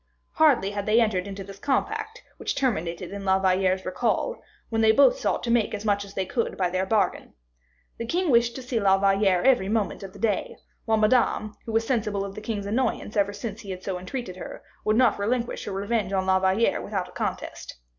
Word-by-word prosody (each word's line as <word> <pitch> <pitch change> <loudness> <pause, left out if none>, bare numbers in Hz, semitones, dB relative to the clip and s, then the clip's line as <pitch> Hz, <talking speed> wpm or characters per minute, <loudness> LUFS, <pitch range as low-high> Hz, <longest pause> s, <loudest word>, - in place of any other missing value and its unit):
Hardly 195 - +3
had 205 0 -4
they 215 +2 +5
entered 205 -5 +1
into 195 0 -6
this 195 0 -11
compact, 435 - -2
which - - -3
terminated 180 -9 -1
in 200 0 -6
La 190 -1 +3
Valliere's 190 0 +1
recall, 235 - -1 0.3
when 225 -1 0
they 220 0 +6
both - - +5
sought - - -1
to 235 - -1
make 230 -3 +2
as 210 +1 -7
much 205 -1 +1
as 200 0 -12
they 190 - -1
could 230 +4 -2
by 180 -2 0
their 185 +1 -1
bargain. 215 - 0 0.6
The 230 - -4
king 350 +2 +1
wished 235 0 +3
to 260 - -6
see 245 -2 -1
La 195 -2 +4
Valliere 195 -2 +3
every 250 -8 +3
moment 215 -2 -1
of 195 -1 -9
the - - -12
day, 210 -3 -1 0.3
while 220 -1 +2
Madame, 215 -1 +2
who - - -3
was 225 +1 +1
sensible 210 -5 -1
of 195 - -7
the 215 - -8
king's 210 -2 -3
annoyance 225 0 -1
ever 205 -1 +2
since 205 +1 -6
he 200 - -11
had 185 0 -6
so 185 -2 -3
entreated 185 0 -6
her, - - -8 0.2
would 215 +1 +2
not 245 -5 +4
relinquish 235 +4 -1
her - - -4
revenge 200 0 -1
on 190 -1 +1
La 190 0 +3
Valliere 190 +4 +2
without 195 -3 -3
a - - -14
contest. - - -5
205 Hz, 220 wpm, -25 LUFS, 195-230 Hz, 0.6 s, they